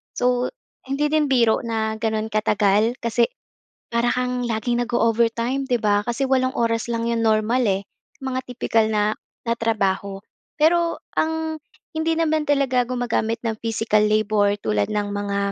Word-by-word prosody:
So, 250 0 +1 0.4
hindi 295 +2 0
din 305 -2 +2
biro 235 -4 +3
na 220 -1 -2
gano'n 220 -1 -1
katagal 210 +2 +2
kasi 235 0 +2 0.6
para 235 +1 +1
kang 250 0 -1
laging 240 +1 0
nag-o-overtime, 235 +2 +1
'di 245 -3 0
ba? 205 -1 +2
Kasi 250 +3 -1
walong 260 -1 +2
oras 230 -1 0
lang 230 0 -1
'yong 230 -1 0
normal 220 +3 +2
eh, 195 -1 +1 0.4
mga 260 -1 -3
tipikal 230 -2 +1
na 210 0 +1 0.3
na 230 - +3
trabaho. 200 -3 -1 0.4
Pero 335 +2 +3 0.2
ang 320 0 0 0.3
hindi 320 +1 0
naman 315 -2 +1
talaga 265 -4 +2
gumagamit 240 -2 -1
ng 225 -2 -2
physical 225 -2 +1
labor 210 -1 +2
tulad 105 -1 +1
ng 205 -1 -1
mga, 200 0 -2
230 Hz, 145 wpm, -22 LUFS, 215-255 Hz, 0.6 s, biro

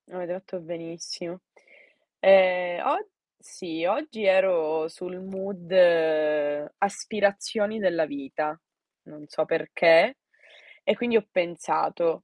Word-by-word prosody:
Avete 180 -1 -6
fatto 185 0 -9
benissimo. 170 +1 -9 0.8
Ehm, 180 -2 +4
og 350 +11 0 0.3
sì, 165 -2 -7
oggi 290 - -2
ero 170 -5 +2
sul 180 +2 -9
mood 190 -1 -8 1.1
aspirazioni 205 +1 -1
della 170 -5 +1
vita. 150 +2 -5 0.4
Non 150 0 -15
so 155 - -2
perché. 165 - +4 0.7
E - - +2
quindi 240 -2 +2
ho 215 -1 -2
pensato: 170 -1 -1
180 Hz, 100 wpm, -25 LUFS, 165-195 Hz, 1.1 s, Ehm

